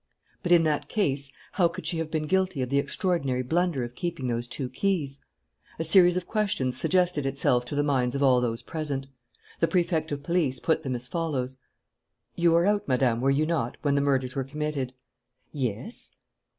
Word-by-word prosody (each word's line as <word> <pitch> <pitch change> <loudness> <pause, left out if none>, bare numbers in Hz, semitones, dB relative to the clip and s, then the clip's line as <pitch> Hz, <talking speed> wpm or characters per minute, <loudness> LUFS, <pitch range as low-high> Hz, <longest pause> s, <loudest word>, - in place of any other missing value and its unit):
But, 175 - -2
in 170 -2 +7
that 150 -2 0
case, 140 -10 0 0.2
how 180 -3 +3
could 170 +2 -8
she 170 - -1
have 165 -1 -2
been 155 -1 -1
guilty 185 -4 +1
of 125 - -4
the 140 +1 +2
extraordinary 140 -4 0
blunder 165 0 0
of 120 0 -6
keeping 170 -4 -4
those 120 -1 -1
two 130 +1 -4
keys? 145 -1 -1 0.6
A 165 - -1
series 175 +1 +6
of 180 - -2
questions 200 - 0
suggested 180 +1 +1
itself 135 -2 +1
to 135 - -5
the 145 - +2
minds 130 -3 +1
of 140 - 0
all 130 -2 +5
those 115 -1 -2
present. 145 -4 -3 0.5
The 165 - +3
Prefect 165 -2 0
of 140 -1 -3
Police 155 -6 0
put 160 - +1
them 130 -4 -2
as 125 +1 -5
follows: 135 -5 -2 0.8
"You 170 -1 +3
were 170 +1 +4
out, 205 0 +1
Madame, 125 -3 +2
were 135 - +2
you 140 +3 +3
not, 155 -8 -1
when 145 -2 +2
the 140 - +2
murders 135 -2 +1
were 135 - 0
committed?" 140 -2 -3 0.6
"Yes." 130 - -4
145 Hz, 190 wpm, -27 LUFS, 130-170 Hz, 0.8 s, in